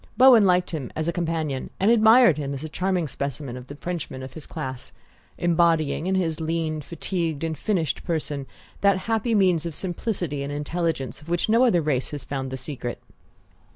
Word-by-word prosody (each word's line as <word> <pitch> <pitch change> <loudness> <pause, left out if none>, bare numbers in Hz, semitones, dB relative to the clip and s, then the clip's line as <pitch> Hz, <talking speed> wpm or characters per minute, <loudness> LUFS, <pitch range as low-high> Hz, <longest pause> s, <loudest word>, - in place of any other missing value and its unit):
Bowen 245 -5 +8
liked 180 0 +2
him 150 -7 -4
as 160 +1 -2
a 170 - 0
companion 160 -5 -2
and 200 +4 +4
admired 225 - +7
him 140 -1 -3
as 135 - -6
a 155 - -5
charming 180 0 0
specimen 140 -1 -4
of 125 0 -9
the 145 - -8
Frenchman 150 -5 -5
of 130 - -8
his 160 - -10
class, 130 -1 -6 0.4
embodying 165 -2 +2
in 190 - +1
his 165 -4 0
lean, 160 -1 -1
fatigued 165 -1 -3
and 160 -1 -1
finished 170 0 -1
person 150 -5 -2 0.3
that 200 -1 +4
happy 225 +1 +1
mean 185 -4 +4
of 170 -3 -4
simplicity 175 -5 -3
and 140 +1 -4
intelligence 150 -1 -2
of 150 - -13
which 175 +4 0
no 230 +4 +5
other 175 -9 +3
race 135 -4 0
has 145 -3 -6
found 135 0 -4
the 130 - -4
secret. 130 -2 -5
165 Hz, 190 wpm, -24 LUFS, 145-180 Hz, 0.4 s, Bowen